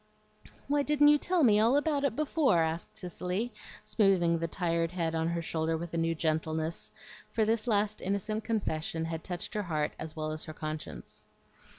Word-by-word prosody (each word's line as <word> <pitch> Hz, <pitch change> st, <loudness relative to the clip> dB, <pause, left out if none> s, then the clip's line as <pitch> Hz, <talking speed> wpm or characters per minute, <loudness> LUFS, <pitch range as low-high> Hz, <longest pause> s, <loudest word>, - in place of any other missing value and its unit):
"Why 290 Hz, 0 st, +2 dB
didn't 295 Hz, 0 st, +5 dB
you 295 Hz, 0 st, +6 dB
tell 355 Hz, 0 st, +2 dB
me 210 Hz, -4 st, +6 dB
all 230 Hz, +6 st, +5 dB
about 290 Hz, -1 st, +1 dB
it 275 Hz, -5 st, +1 dB
before?" 290 Hz, -, +2 dB
asked 160 Hz, +5 st, -3 dB
Cicely, 185 Hz, +4 st, -3 dB, 0.3 s
smoothing 180 Hz, -6 st, +3 dB
the 165 Hz, -, -1 dB
tired 165 Hz, -1 st, -1 dB
head 165 Hz, -3 st, -1 dB
on 160 Hz, 0 st, 0 dB
her 170 Hz, 0 st, -1 dB
shoulder 160 Hz, 0 st, -1 dB
with 170 Hz, +1 st, -6 dB
a -, -, -1 dB
new 165 Hz, 0 st, +1 dB
gentleness; 160 Hz, 0 st, -1 dB, 0.4 s
for 220 Hz, -, +1 dB
this 225 Hz, +2 st, 0 dB
last 210 Hz, -1 st, +1 dB
innocent 200 Hz, +3 st, -2 dB
confession 165 Hz, -7 st, -1 dB
had 165 Hz, 0 st, -4 dB
touched 180 Hz, -2 st, -5 dB
her 210 Hz, -, 0 dB
heart 155 Hz, -5 st, -1 dB
as 160 Hz, 0 st, -6 dB
well 155 Hz, -1 st, -2 dB
as 155 Hz, 0 st, -4 dB
her 155 Hz, -, -7 dB
conscience. 155 Hz, -, -7 dB
175 Hz, 185 wpm, -30 LUFS, 160-220 Hz, 0.4 s, you